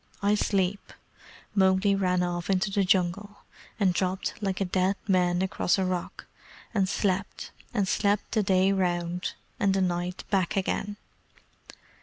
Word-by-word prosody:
I 205 Hz, +1 st, +3 dB
sleep." 195 Hz, -1 st, 0 dB, 0.6 s
Mowgli 190 Hz, 0 st, +3 dB
ran 180 Hz, -2 st, +1 dB
off 175 Hz, 0 st, -3 dB
into 195 Hz, +1 st, +1 dB
the 200 Hz, 0 st, +2 dB
Jungle, 195 Hz, +2 st, 0 dB, 0.4 s
and 190 Hz, -3 st, +3 dB
dropped 185 Hz, +1 st, -1 dB
like 195 Hz, -2 st, -1 dB
a 195 Hz, -, +1 dB
dead 185 Hz, +2 st, +1 dB
man 180 Hz, -2 st, +2 dB
across 175 Hz, 0 st, +1 dB
a 190 Hz, -, +1 dB
rock, 180 Hz, -1 st, -4 dB, 0.5 s
and 195 Hz, -4 st, +1 dB
slept 195 Hz, 0 st, -2 dB, 0.2 s
and 205 Hz, -5 st, 0 dB
slept 205 Hz, +1 st, +1 dB
the 220 Hz, -, +2 dB
day 190 Hz, -1 st, +3 dB
round, 175 Hz, -2 st, -1 dB, 0.3 s
and 195 Hz, -1 st, +2 dB
the -, -, +2 dB
night 180 Hz, 0 st, -2 dB
back 195 Hz, +1 st, +1 dB
again. 205 Hz, +2 st, -1 dB
190 Hz, 145 wpm, -27 LUFS, 180-200 Hz, 0.6 s, I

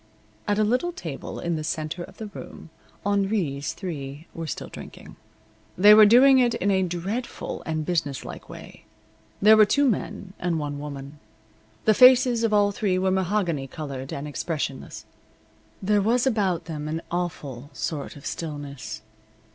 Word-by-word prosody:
At 205 Hz, -, +1 dB
a 215 Hz, -, +3 dB
little 250 Hz, +11 st, +1 dB
table 160 Hz, -, -7 dB
in 170 Hz, -1 st, -2 dB
the 155 Hz, -, -4 dB
center 155 Hz, +2 st, -3 dB
of -, -, -13 dB
the 220 Hz, -, -6 dB
room 200 Hz, -5 st, -10 dB, 0.3 s
Henri's 195 Hz, -8 st, 0 dB
three 145 Hz, -5 st, -6 dB
were 165 Hz, -1 st, -5 dB
still -, -, -5 dB
drinking. -, -, -11 dB, 0.6 s
They 205 Hz, +3 st, +8 dB
were 215 Hz, 0 st, +9 dB
doing 260 Hz, +4 st, +7 dB
it 240 Hz, -2 st, +3 dB
in 200 Hz, +2 st, 0 dB
a 190 Hz, -1 st, +3 dB
dreadful 185 Hz, +7 st, -4 dB
and 155 Hz, -1 st, -2 dB
businesslike 150 Hz, -6 st, -3 dB
way. -, -, -12 dB, 0.6 s
There 215 Hz, +1 st, +8 dB
were 215 Hz, -, +7 dB
two 285 Hz, +5 st, +3 dB
men 200 Hz, -4 st, -3 dB
and 175 Hz, -2 st, 0 dB
one 145 Hz, -2 st, -4 dB
woman. 140 Hz, 0 st, -8 dB, 0.7 s
The 215 Hz, -, +6 dB
faces 250 Hz, 0 st, +6 dB
of 225 Hz, -, +2 dB
all 205 Hz, -1 st, +4 dB
three 195 Hz, -2 st, 0 dB
were 190 Hz, 0 st, +1 dB
mahogany 185 Hz, -6 st, 0 dB
colored 135 Hz, -2 st, -6 dB
and 140 Hz, +2 st, -5 dB
expressionless. 145 Hz, -1 st, -4 dB, 0.8 s
There 205 Hz, +1 st, +3 dB
was 235 Hz, +5 st, +2 dB
about 195 Hz, -9 st, +1 dB
them 150 Hz, -2 st, -5 dB
an 160 Hz, +2 st, -3 dB
awful 145 Hz, -7 st, -4 dB
sort 150 Hz, -2 st, -4 dB
of 140 Hz, -, -13 dB
stillness. 140 Hz, -9 st, -6 dB
175 Hz, 155 wpm, -25 LUFS, 150-210 Hz, 0.8 s, were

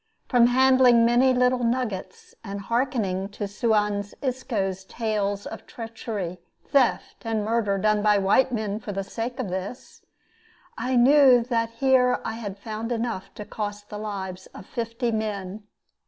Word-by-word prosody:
From 240 Hz, -2 st, +5 dB
handling 255 Hz, -2 st, +5 dB
many 245 Hz, +3 st, +4 dB
little 250 Hz, 0 st, +2 dB
nuggets, 230 Hz, -6 st, -3 dB
and 200 Hz, -2 st, -5 dB
hearkening 215 Hz, -4 st, -1 dB
to 205 Hz, 0 st, -5 dB
Suan 210 Hz, -1 st, +1 dB, 0.2 s
Isco's 210 Hz, -8 st, -2 dB
tales 205 Hz, -2 st, -2 dB
of 225 Hz, -, -8 dB
treachery, 220 Hz, -6 st, -6 dB, 0.3 s
theft, 270 Hz, -4 st, +1 dB
and 220 Hz, -2 st, -1 dB
murder 215 Hz, -3 st, +1 dB
done 215 Hz, +1 st, +2 dB
by 210 Hz, 0 st, +4 dB
white 200 Hz, +7 st, +3 dB
men 215 Hz, -3 st, -2 dB
for 210 Hz, -, -6 dB
the 195 Hz, 0 st, -2 dB
sake 230 Hz, +5 st, -5 dB
of 240 Hz, -7 st, -2 dB
this, 190 Hz, +7 st, -6 dB, 0.7 s
I 255 Hz, +1 st, -1 dB
knew 255 Hz, -1 st, +6 dB
that 230 Hz, -2 st, 0 dB
here 250 Hz, +1 st, +3 dB
I -, -, -2 dB
had 205 Hz, -4 st, -6 dB
found 220 Hz, +3 st, -5 dB
enough 230 Hz, -5 st, -3 dB
to 210 Hz, -, -7 dB
cost 205 Hz, -1 st, -5 dB
the 210 Hz, -, -5 dB
lives 190 Hz, -3 st, -5 dB
of -, -, -10 dB
fifty 235 Hz, +1 st, -3 dB
men. 210 Hz, -2 st, -4 dB
225 Hz, 150 wpm, -25 LUFS, 205-245 Hz, 0.7 s, knew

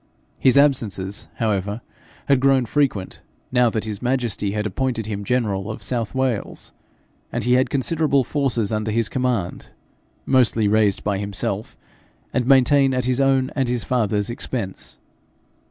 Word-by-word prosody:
His 130 Hz, +1 st, +4 dB
absences, 105 Hz, -9 st, +1 dB
however, 105 Hz, -1 st, -1 dB, 0.5 s
had 140 Hz, -2 st, +3 dB
grown 135 Hz, -1 st, +3 dB
frequent 115 Hz, -6 st, -1 dB, 0.3 s
now 125 Hz, -1 st, +4 dB
that 110 Hz, -1 st, -2 dB
his 105 Hz, -2 st, -5 dB
majesty 120 Hz, -5 st, -1 dB
had 105 Hz, 0 st, -2 dB
appointed 115 Hz, +2 st, -2 dB
him 100 Hz, -1 st, -4 dB
general 105 Hz, -4 st, -1 dB
of 110 Hz, -1 st, -6 dB
South 115 Hz, +2 st, -2 dB
Wales, 130 Hz, -5 st, -2 dB, 0.6 s
and -, -, -2 dB
he 125 Hz, -, +2 dB
had 130 Hz, +1 st, +3 dB
considerable 140 Hz, 0 st, +1 dB
forces 120 Hz, -6 st, -1 dB
under 110 Hz, 0 st, -1 dB
his 115 Hz, 0 st, 0 dB
command 125 Hz, -8 st, -2 dB, 0.6 s
mostly 120 Hz, -5 st, +3 dB
raised 105 Hz, -1 st, +2 dB
by 100 Hz, -2 st, -1 dB
himself, 100 Hz, +1 st, -3 dB, 0.6 s
and 125 Hz, -1 st, 0 dB
maintained 135 Hz, 0 st, +4 dB
at 125 Hz, -1 st, -1 dB
his 130 Hz, +1 st, +1 dB
own 135 Hz, -1 st, +2 dB
and 135 Hz, -4 st, 0 dB
his 120 Hz, -3 st, -1 dB
father's 105 Hz, -1 st, 0 dB
expense. 115 Hz, -5 st, -5 dB
120 Hz, 145 wpm, -22 LUFS, 105-130 Hz, 0.6 s, His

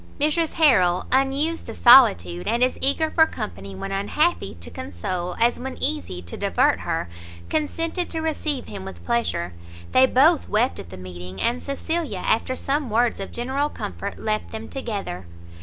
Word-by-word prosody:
Mrs 310 Hz, +2 st, +1 dB
Harrel, 190 Hz, -, +4 dB
unused 275 Hz, +5 st, +1 dB
to -, -, -6 dB
solitude, 90 Hz, -, +6 dB
and 240 Hz, +1 st, +2 dB
as 255 Hz, -, +1 dB
eager 310 Hz, +4 st, +1 dB
for 320 Hz, -1 st, +5 dB
company 95 Hz, -, -7 dB
when 195 Hz, -, -5 dB
unhappy 205 Hz, -, 0 dB
to 85 Hz, -1 st, -10 dB
console, 95 Hz, -, -4 dB
as 235 Hz, +1 st, +2 dB
when 260 Hz, +1 st, -6 dB
easy 280 Hz, -, 0 dB
to 85 Hz, -, -7 dB
divert -, -, +2 dB
her, 85 Hz, -, -2 dB, 0.4 s
consented 330 Hz, +3 st, -1 dB
to 325 Hz, -, -4 dB
receive 310 Hz, -4 st, -2 dB
him 200 Hz, -2 st, -8 dB
with 190 Hz, -, -10 dB
pleasure; 235 Hz, -, -1 dB, 0.4 s
they 260 Hz, 0 st, +6 dB
both 295 Hz, +6 st, +4 dB
wept 230 Hz, +5 st, +1 dB
at 85 Hz, -, -9 dB
the 95 Hz, -, -9 dB
meeting, 90 Hz, 0 st, -9 dB
and 240 Hz, +2 st, 0 dB
Cecilia, 280 Hz, -, -3 dB
after 230 Hz, +3 st, +1 dB
some 275 Hz, 0 st, -1 dB
words 235 Hz, +2 st, +1 dB
of 195 Hz, -, -6 dB
general 265 Hz, +5 st, -1 dB
comfort, -, -, -6 dB
left 215 Hz, 0 st, -2 dB
them 220 Hz, 0 st, -7 dB
together. 200 Hz, -, -5 dB
240 Hz, 165 wpm, -23 LUFS, 175-290 Hz, 0.4 s, solitude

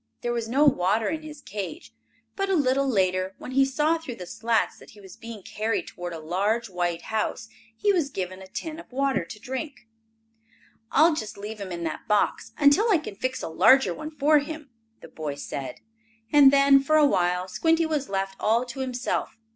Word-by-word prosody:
There 240 Hz, -, -1 dB
was 230 Hz, -1 st, -2 dB
no 280 Hz, +5 st, +3 dB
water 215 Hz, -4 st, +2 dB
in 315 Hz, 0 st, -3 dB
his 305 Hz, -1 st, -10 dB
cage, 210 Hz, -, -7 dB, 0.4 s
but, 390 Hz, -1 st, -1 dB
a 385 Hz, -, +3 dB
little 275 Hz, -2 st, +2 dB
later, 185 Hz, -3 st, +1 dB
when -, -, -8 dB
he 270 Hz, +1 st, +4 dB
saw 300 Hz, +5 st, +1 dB
through 270 Hz, -7 st, -7 dB
the 180 Hz, -, -8 dB
slats, 225 Hz, +5 st, -1 dB
that -, -, -15 dB
he 210 Hz, -, -16 dB
was 190 Hz, -2 st, -13 dB
being 230 Hz, -4 st, -9 dB
carried 215 Hz, +2 st, -2 dB
toward 175 Hz, 0 st, -7 dB
a 165 Hz, -, -5 dB
large, 200 Hz, +7 st, -1 dB
white 175 Hz, -1 st, -2 dB
house, 220 Hz, +1 st, -2 dB, 0.3 s
he 410 Hz, -, +2 dB
was 330 Hz, -7 st, +1 dB
given 185 Hz, -5 st, -5 dB
a 190 Hz, -, -11 dB
tin 315 Hz, -, -6 dB
of 335 Hz, -, -13 dB
water 270 Hz, -5 st, 0 dB
to 190 Hz, +6 st, -10 dB
drink. 265 Hz, +1 st, -6 dB, 1.0 s
"I'll 320 Hz, +3 st, +5 dB
just 215 Hz, -10 st, -5 dB
leave 210 Hz, +1 st, -7 dB
him 190 Hz, -2 st, -6 dB
in 170 Hz, -1 st, -4 dB
that 160 Hz, -, -5 dB
box 210 Hz, -1 st, +1 dB
until 300 Hz, +11 st, +4 dB
I 395 Hz, -, +5 dB
can 305 Hz, -9 st, -7 dB
fix 255 Hz, +6 st, -3 dB
a -, -, -2 dB
larger 220 Hz, +11 st, +5 dB
one 310 Hz, +1 st, -7 dB
for 300 Hz, 0 st, +3 dB
him," 300 Hz, -1 st, -7 dB, 0.3 s
the -, -, -11 dB
boy 150 Hz, -3 st, -5 dB
said, 140 Hz, -1 st, -6 dB, 0.5 s
and 285 Hz, -2 st, +8 dB
then, 275 Hz, 0 st, +6 dB
for 310 Hz, +3 st, +3 dB
a 300 Hz, -, +6 dB
while, 180 Hz, -7 st, +1 dB
Squinty 325 Hz, -, +2 dB
was 300 Hz, -3 st, -2 dB
left 195 Hz, 0 st, -2 dB
all 230 Hz, +3 st, +2 dB
to 245 Hz, +2 st, -8 dB
himself. 255 Hz, -3 st, -2 dB
240 Hz, 200 wpm, -25 LUFS, 195-290 Hz, 1.0 s, and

